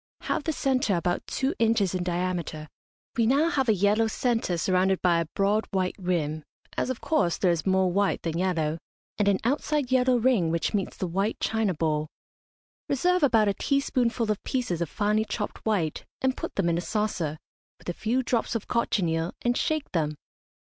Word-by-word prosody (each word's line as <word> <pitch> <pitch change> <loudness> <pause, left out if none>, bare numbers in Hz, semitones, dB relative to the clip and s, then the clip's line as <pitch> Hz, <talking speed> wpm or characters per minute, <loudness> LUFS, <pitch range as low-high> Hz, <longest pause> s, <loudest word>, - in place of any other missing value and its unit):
Have - - -2
the 320 - +1
centre 265 -8 +1
about 175 +1 -1
two 270 +3 -1
inches 220 -5 +2
in 185 - -1
diameter. 175 -3 -2 0.5
We 230 -2 +2
now 285 +6 +3
have 270 -7 +1
a - - +6
yellow 205 +4 +3
centre 225 -5 0
surrounded 185 +2 +2
by 175 -2 +4
a 165 - -2
broad 205 +2 +1
white 185 -2 0
rim 155 -4 -1 0.3
(as, - - -1
of 260 - -3
course, 290 - +1
there 180 - +3
is 170 +1 -2
more 190 -1 +3
white 200 +2 +1
than 165 -1 -2
yellow), 165 -4 0 0.4
and 205 - +2
an 200 -1 +4
outside 280 +1 0
yellow 255 -1 +4
ring, 230 -8 +2
which 165 0 -1
meets 200 -3 -2
the - - -2
white 195 +5 -1
china 220 -5 0
bowl. 155 -1 0 0.8
Reserve 360 +6 +2
about 225 -7 +4
a 200 - +2
teaspoonful 245 -4 0
of 210 - -3
pieces 235 -10 -2
of 170 - -1
finely 210 +3 +1
chopped 215 -1 -5
white, 175 -8 0 0.2
and 260 0 +1
put - - -6
them 195 -3 +1
in 170 0 +1
a - - -2
saucer, 180 -8 -2 0.4
with - - -18
a 175 - -1
few 240 +8 0
drops 235 -1 -1
of 225 - -3
cochineal, 170 -8 0
and 240 0 +2
shake 310 +2 -1
them. 150 -3 0
200 Hz, 190 wpm, -27 LUFS, 175-240 Hz, 0.8 s, a